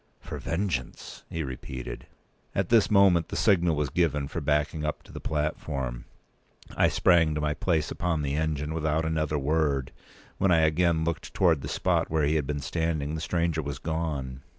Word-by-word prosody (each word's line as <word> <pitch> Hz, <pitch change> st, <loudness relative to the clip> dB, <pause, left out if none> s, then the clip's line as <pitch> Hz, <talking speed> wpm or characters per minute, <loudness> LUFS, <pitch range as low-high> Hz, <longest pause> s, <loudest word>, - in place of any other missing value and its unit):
"For -, -, -7 dB
vengeance!" 80 Hz, -8 st, -3 dB
he 80 Hz, -, -3 dB
repeated. 65 Hz, -1 st, -7 dB, 0.5 s
At 95 Hz, -2 st, 0 dB
this 115 Hz, -3 st, +5 dB
moment 95 Hz, -5 st, +4 dB
the -, -, -5 dB
signal 90 Hz, -6 st, +3 dB
was 75 Hz, -3 st, -1 dB
given 75 Hz, -4 st, +1 dB
for 85 Hz, -, -4 dB
backing 75 Hz, +2 st, 0 dB
up 75 Hz, 0 st, -3 dB
to -, -, -15 dB
the -, -, -7 dB
platform. 70 Hz, -5 st, -3 dB, 0.7 s
I -, -, +4 dB
sprang 80 Hz, -4 st, +3 dB
to 75 Hz, -, -1 dB
my 75 Hz, 0 st, 0 dB
place 80 Hz, -1 st, 0 dB
upon 80 Hz, -4 st, -1 dB
the 70 Hz, -1 st, -1 dB
engine 75 Hz, 0 st, -1 dB
without 80 Hz, 0 st, 0 dB
another 80 Hz, -1 st, 0 dB
word. 70 Hz, -2 st, 0 dB
p. -, -, -29 dB, 0.4 s
215When 95 Hz, -, +4 dB
I 80 Hz, -2 st, +5 dB
again 80 Hz, +1 st, +2 dB
looked 85 Hz, -1 st, -3 dB
towards 85 Hz, -6 st, +3 dB
the -, -, -5 dB
spot -, -, 0 dB
where 80 Hz, -2 st, +1 dB
he 75 Hz, -, +2 dB
had 75 Hz, -4 st, 0 dB
been 75 Hz, -1 st, -2 dB
standing, 80 Hz, 0 st, -1 dB
the 80 Hz, -, -3 dB
stranger 85 Hz, -1 st, 0 dB
was 70 Hz, -2 st, -5 dB
gone. 75 Hz, -4 st, -3 dB
80 Hz, 185 wpm, -27 LUFS, 75-85 Hz, 0.7 s, this